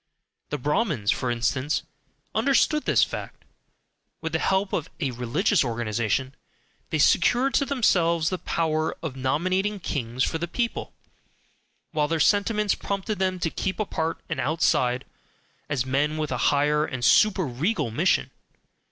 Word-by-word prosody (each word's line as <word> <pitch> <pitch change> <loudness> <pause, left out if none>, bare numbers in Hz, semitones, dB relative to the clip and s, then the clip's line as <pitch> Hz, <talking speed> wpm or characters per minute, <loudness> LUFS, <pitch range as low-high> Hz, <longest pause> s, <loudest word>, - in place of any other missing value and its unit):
The 150 - -2
Brahmins, 145 - 0
for 125 - -1
instance, 130 +5 0 0.5
understood 295 +2 +2
this - - +4
fact. - - -6 0.7
With 160 - -4
the 160 - +1
help 190 +2 0
of 160 - -2
a 140 -5 -1
religious 135 - +1
organization, 120 +2 -1 0.6
they - - 0
secured 260 +3 +3
to 280 - +2
themselves 170 - +2
the 185 - -2
power 160 -1 -1
of 150 -5 -4
nominating 185 +10 0
kings 130 -7 -2
for 160 - -1
the 170 - -2
people, 235 +7 -3 1.0
while 150 -2 +1
their 165 +1 -1
sentiments 205 +4 +2
prompted 200 +1 -3
them 185 -1 0
to 165 - 0
keep 190 +1 -3
apart 165 -6 -2
and - - -3
outside, 130 -3 +1 0.6
as 135 -4 0
men 145 +4 0
with 155 -2 -2
a 125 - -1
higher 150 +1 +2
and 130 -5 -3
super 195 - +4
regal 135 - -1
mission. - - +1
155 Hz, 145 wpm, -25 LUFS, 130-190 Hz, 1.0 s, this